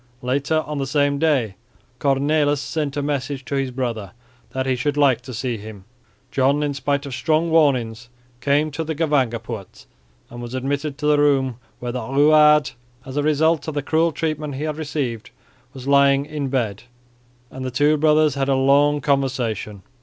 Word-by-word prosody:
Later 140 +5 0
on 150 -1 -4
the 135 - -2
same 145 0 +1
day 140 -10 +1 0.5
Cornelis 145 +1 +2
sent 145 -1 -3
a 145 - -1
message 140 -1 -3
to 125 - -6
his 135 -1 0
brother 120 -7 -4 0.4
that 130 0 -3
he 130 -1 +1
should 145 +3 -2
like 135 -5 +3
to 130 +1 -10
see 120 0 -3
him. 105 -2 -11 0.5
John, 140 +2 +2
in 145 -1 -1
spite 140 +1 -1
of 140 - -6
strong 160 +4 0
warnings, 120 -7 +2 0.3
came 145 +4 +1
to 155 +3 -3
the 160 0 -4
Gevangenpoort 120 - -2 0.5
and 120 0 -8
was 120 +1 -6
admitted 140 +2 -2
to 150 - -5
the 150 -1 +4
room 135 -4 +2 0.2
where 120 0 -4
the 125 +1 -4
Ruwaard, 150 +4 +4 0.3
as 130 - -8
a 145 - +1
result 155 +1 +2
of 155 - -4
the 145 - -1
cruel 165 +3 +2
treatment 155 -2 -3
he 140 - -4
had 155 -1 -3
received, 140 -7 -3 0.4
was 130 -1 -10
lying 140 0 +4
in 150 -2 -4
bed; 115 -7 -2 0.7
and 130 - -7
the 130 - -2
two 145 +4 +2
brothers 155 -1 +3
had 135 0 -1
a 135 - +3
long 145 +2 +3
conversation. 125 -8 -1
140 Hz, 180 wpm, -21 LUFS, 130-150 Hz, 0.7 s, the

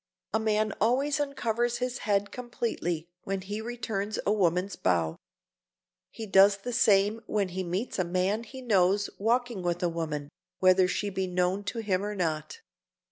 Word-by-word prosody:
A 220 - +3
man 215 -1 +1
always 270 +7 +2
uncovers 240 -4 0
his 250 +1 -3
head 200 0 +2
completely 225 -9 -3 0.2
when 195 0 -2
he 205 +3 -5
returns 220 -3 -3
a 205 - +3
woman's 185 -1 +1
bow. 85 -3 +1 0.9
He 225 - -7
does 195 0 +6
the 245 +5 -5
same 205 +1 +3
when 200 -3 0
he 185 +1 -3
meets 185 +6 -3
a - - +3
man 185 +5 0
he 260 +3 -10
knows 200 -2 +2
walking 235 0 +1
with 175 0 -1
a 175 - +2
woman, 155 -4 -4 0.3
whether 185 0 +5
she 200 +2 -2
be 190 0 -2
known 180 +2 0
to 230 +2 -3
him 195 -3 0
or 210 0 -3
not. 165 - -2
200 Hz, 165 wpm, -28 LUFS, 180-225 Hz, 0.9 s, does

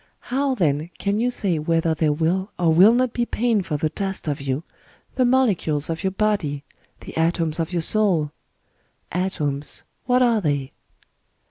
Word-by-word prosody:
How, 275 0 +1
then, 155 - 0
can 200 +1 -1
you 245 +2 +2
say 190 -9 0
whether 165 +1 +1
there 155 -1 +1
will 170 +6 0
or 165 -2 +3
will 195 +8 +7
not 255 -1 +1
be 240 - 0
pain 235 -2 +1
for 160 -5 -3
the 155 +2 0
dust 195 0 -3
of 145 -2 -2
you, 140 +2 -2 0.3
— - - -32
the 255 - +3
molecules 195 - +1
of 165 +4 -4
your 190 - +2
body, 190 -8 -1 0.4
the - - -10
atoms 165 -1 0
of 165 +1 -2
your 170 -2 0
soul?... 180 -8 +2 0.8
Atoms 150 -6 -2
— - - -46
what 250 0 +4
are 230 -3 +3
they 145 -5 -1
175 Hz, 175 wpm, -22 LUFS, 155-215 Hz, 0.8 s, will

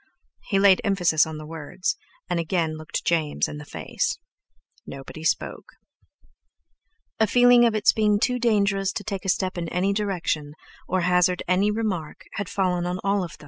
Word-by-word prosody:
He 195 - +1
laid 195 -1 +5
emphasis 175 -6 +3
on 160 -1 -6
the 155 - -8
words, 160 +3 -3 0.3
and 175 -1 -1
again 165 -1 -1
looked 155 0 -5
James 160 -3 +1
in 150 - -7
the 150 - -9
face. - - -3 0.7
Nobody 135 +3 -9
spoke. 165 - -2 1.5
A 220 - +4
feeling 245 +2 +6
of 230 -2 +2
its 215 - +4
being 210 -1 +2
too 250 +3 +1
dangerous 200 -4 +2
to 205 - -4
take 200 -2 -5
a - - -1
step 185 0 0
in 170 -1 -4
any 185 +4 0
direction, 180 -8 -2 0.3
or 185 0 0
hazard 180 0 +2
any 185 +3 +2
remark, 210 -8 -3
had 200 -3 -4
fallen 180 -2 0
on 180 - -2
them 185 - -6
all. 195 -3 0
185 Hz, 170 wpm, -24 LUFS, 165-205 Hz, 1.5 s, feeling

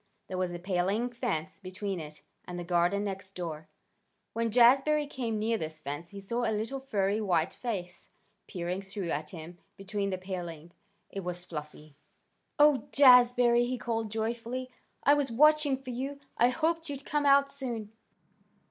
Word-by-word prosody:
There 185 - -5
was 180 -1 0
a 175 - -4
paling 190 +6 0
fence 235 -11 -3
between 190 0 -4
it 150 -1 -9 0.2
and 180 - -6
the 175 - -4
garden 175 +3 +1
next 195 -1 -6
door. 160 -3 -5 0.7
When 230 0 0
Jazbury 270 +6 +5
came 240 -6 -3
near 225 +1 0
this 155 0 -5
fence 145 +3 -6
he 200 - -9
saw 235 +5 -2
a 225 - +1
little 230 +6 -3
furry 210 -5 0
white 175 -6 +1
face 185 -8 -5 0.4
peering 180 +1 -3
through 195 -3 -5
at 150 +1 -3
him 170 0 -10 0.2
between 200 0 -3
the 185 - -2
palings. 175 -3 -7 0.4
It 195 - -4
was 175 0 -5
Fluffy. 150 -3 -9 0.6
"Oh, 295 -3 +5
Jazbury!" 245 -2 +6
he 255 0 -2
called 225 -2 -2
joyfully. 235 +3 -3 0.3
"I 285 - +6
was 285 -4 +1
watching 300 +2 +4
for 260 -1 -8
you. 270 +3 -4 0.2
I 240 - +4
hoped 325 +3 -1
you'd 280 -1 -6
come 295 -1 0
out 280 0 +6
soon." 240 -7 -5
215 Hz, 165 wpm, -30 LUFS, 180-250 Hz, 0.7 s, Jazbury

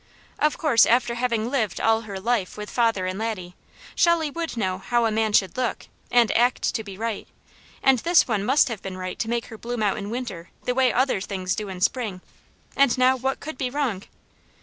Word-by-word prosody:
Of 300 0 +2
course 275 -8 +4
after 240 0 +2
having 235 -1 -1
lived 220 -9 -1
all 225 0 +3
her 200 -4 -7
life 215 -2 -1
with 210 0 -7
father 225 -6 +1
and 185 +2 -3
Laddie, 190 -6 -4 0.4
Shelley 340 -3 +2
would 330 -4 -4
know 185 -4 -1
how 240 +4 +1
a 225 - +1
man 220 0 +1
should 190 -3 +2
look, 255 -2 -2 0.2
and 240 -2 +4
act 245 +2 +2
to 220 - -2
be 200 -3 -9
right; 225 -1 -3 0.6
and 265 -2 +5
this 340 +7 +4
one 215 -5 0
must 265 +6 +4
have 225 -4 -5
been 190 -1 -6
right 185 0 -5
to 225 - -2
make 235 0 -1
her 225 - -11
bloom 240 -1 -3
out 205 - +1
in 205 -1 -5
winter 220 -8 -5 0.2
the 250 - +1
way 255 -1 +3
other 255 -5 +1
things 185 -2 -2
do 205 +1 -4
in 185 -1 -7
spring; 210 -5 0 0.5
and 275 -2 +3
now 255 +1 +4
what 265 +1 -2
could 310 -2 -8
be 255 - -1
wrong? 250 -8 -1
230 Hz, 215 wpm, -24 LUFS, 200-255 Hz, 0.6 s, and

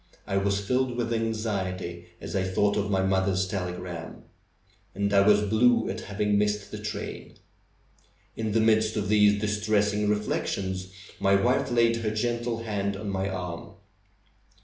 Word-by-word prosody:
I 95 - -3
was 100 0 +1
filled 125 +2 0
with 120 -1 -1
anxiety 95 -6 -3
as - - -6
I 95 - +2
thought 95 +2 +1
of 105 0 -1
my 95 -1 +1
mother's 95 0 +1
telegram. 90 -3 -5 0.7
And 100 +1 0
I 100 - +6
was 105 +1 +5
blue 115 +3 +3
at 110 - -5
having 105 -1 0
missed 105 -1 -1
the - - -6
train. - - -6 1.0
In 110 -2 -2
the 115 - +3
midst 110 0 +3
of 100 -2 -1
these 105 -1 +5
distressing 105 0 +1
reflections 95 -3 -2 0.3
my 95 0 +4
wife 120 +6 +2
laid 115 -1 +3
her 115 -2 -1
gentle 120 +1 -2
hand 100 -3 -2
on 100 0 -4
my 95 0 -1
arm. 90 -3 -6
105 Hz, 150 wpm, -27 LUFS, 95-110 Hz, 1.0 s, I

